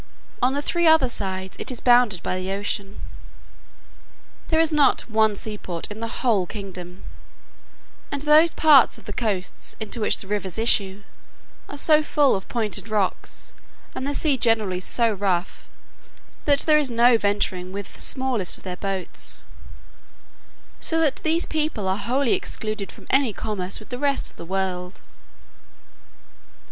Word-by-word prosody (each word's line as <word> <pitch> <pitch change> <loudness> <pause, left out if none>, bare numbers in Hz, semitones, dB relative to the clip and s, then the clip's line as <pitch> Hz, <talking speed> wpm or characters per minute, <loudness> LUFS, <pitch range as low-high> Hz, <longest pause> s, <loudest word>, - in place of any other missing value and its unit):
On 255 +2 +2
the 285 - -2
three 345 +1 +1
other 315 -4 +5
sides, 190 -4 -4
it - - -2
is 250 -3 -3
bounded 240 -6 +3
by - - -2
the 185 +1 -4
ocean. 200 0 -4 1.5
There 320 - +1
is 325 -1 +2
not 295 -2 +3
one 220 -2 +2
seaport 200 -5 -4
in 210 - -7
the 230 - -3 0.2
whole 210 -8 +2
kingdom: 185 -3 -9 1.1
and 285 0 -2
those 305 +2 +6
parts 300 -5 +5
of - - -16
the - - -6
coasts 200 -5 -3
into 220 +2 -4
which - - +3
the - - -3
rivers 200 -2 -3
issue, 205 -3 +2 0.7
are 285 - -7
so 305 +1 +4
full 295 -2 +2
of 190 - -6
pointed 215 -4 -2
rocks, 205 -3 -3 0.4
and 265 - -4
the 285 - -1
sea 295 -4 +2
generally 220 -7 +1
so 230 +4 +1
rough, 190 -3 -2 0.8
that 285 -1 +3
there 305 -1 +4
is 285 -3 -1
no 240 +1 +4
venturing 200 -4 -1
with 200 0 -7
the - - -11
smallest 260 -8 +1
of - - -18
their 180 -1 -6
boats; 195 -2 -2 1.4
so 325 - 0
that 310 -4 +2
these 330 +2 +2
people 305 -11 -2
are 190 +1 0
wholly 245 +5 0
excluded 215 -2 -4
from - - -16
any 265 -5 +2
commerce 195 -4 -4
with 215 - -15
the 245 - -5
rest 280 -1 0
of - - -26
the - - -10
world. 185 0 -4
220 Hz, 155 wpm, -23 LUFS, 195-275 Hz, 1.5 s, those